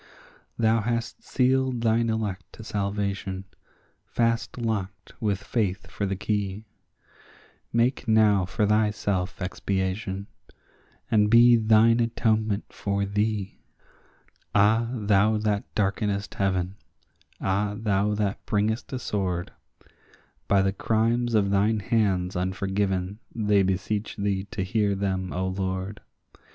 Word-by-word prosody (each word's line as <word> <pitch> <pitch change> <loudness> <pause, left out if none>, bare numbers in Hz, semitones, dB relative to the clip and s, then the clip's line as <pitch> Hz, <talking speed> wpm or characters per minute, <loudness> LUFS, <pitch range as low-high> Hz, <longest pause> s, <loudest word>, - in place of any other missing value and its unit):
Thou 115 -1 +3
hast 115 +1 -2
sealed 130 -1 +1
thine 115 0 +2
elect 100 -5 -3
to 115 - -10
salvation, 100 -2 -3 0.6
fast 115 0 -1
locked 100 -7 -3
with 105 -2 -1
faith 105 -5 -1
for 100 - -2
the 95 - -1
key; 100 +1 -2 1.1
Make 120 +2 +1
now 105 -4 +4
for 105 +3 0
thyself 105 -3 0
expiation, 95 +1 -2 0.9
and 105 -2 +4
be 120 +1 +7
thine 115 +1 +5
atonement 110 -3 0
for 100 0 -1
thee. 105 0 -2 1.0
Ah, 110 +3 +4
thou 105 -2 +2
that 105 -1 0
darkenest 100 -1 -1
heaven—ah, 95 +2 -3
thou 105 -1 +1
that 105 -1 -2
bringest 110 +2 0
a - - -1
sword— 95 -7 -2 1.0
By 100 -1 +4
the 95 0 +1
crimes 115 +3 +1
of 100 -2 +3
thine 105 +2 +2
hands 95 -4 0
unforgiven 95 +1 -1 0.2
they 105 -3 +3
beseech 100 +3 -1
thee 100 -1 -1
to 100 -1 -4
hear 100 +1 +1
them, 95 -2 -2
O 95 +1 -2
Lord. 95 +1 -3
105 Hz, 115 wpm, -26 LUFS, 95-110 Hz, 1.1 s, be